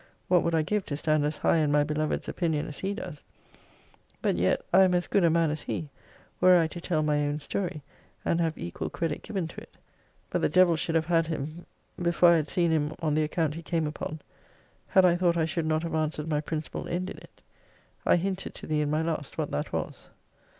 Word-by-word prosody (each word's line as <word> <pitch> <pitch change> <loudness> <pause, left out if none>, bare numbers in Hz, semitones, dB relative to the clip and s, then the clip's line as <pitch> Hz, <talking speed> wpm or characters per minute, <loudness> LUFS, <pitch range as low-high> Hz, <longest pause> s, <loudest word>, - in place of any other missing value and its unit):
What 180 -1 +5
would 170 0 0
I 160 - +3
give 210 +5 0
to 145 - -3
stand 155 -1 +1
as 150 - -2
high - - +3
in 150 -2 +2
my 145 0 +4
beloved's 150 0 -2
opinion 160 -4 -1
as 145 - -7
he 195 +1 -2
does! 150 -8 -7 1.0
but - - +1
yet 90 +2 +1
I 190 - +8
am 185 -1 +4
as 175 - +1
good 200 - +2
a 170 - +5
man 165 -1 +2
as 155 - -4
he, 155 - -4 0.5
were 185 -1 +7
I 165 - +3
to 175 - -8
tell 160 -3 0
my 150 -1 +2
own 145 +1 -2
story, 160 -1 -3 0.4
and 170 - +2
have 165 -1 0
equal 85 -2 -4
credit 160 - -3
given 190 -6 -3
to - - -9
it. - - -16 0.6
But - - 0
the - - +2
devil 180 -2 +5
should 165 +1 -2
have 160 -1 +2
had 165 -1 +2
him 160 +1 -5 0.3
before 175 0 +5
I 170 - +6
had 155 -2 -1
seen 170 0 +1
him 155 -1 0
on 155 -3 0
the 155 +1 +2
account 155 0 0
he 165 - -7
came 165 -1 -1
upon, 155 +1 -5 0.7
had 190 -1 +5
I 175 -1 +5
thought 175 -1 +2
I 160 - +2
should 165 0 -2
not 155 +1 +1
have 170 - -4
answered 155 -1 -1
my 150 -2 0
principal 155 0 -4
end 185 +2 -2
in - - -8
it. - - -19 0.6
I - - +4
hinted 190 +2 -2
to - - -7
thee 155 -1 0
in 150 - 0
my 155 +2 +1
last 160 -4 -3
what - - -2
that - - -2
was. - - -4
160 Hz, 235 wpm, -28 LUFS, 150-175 Hz, 1.0 s, I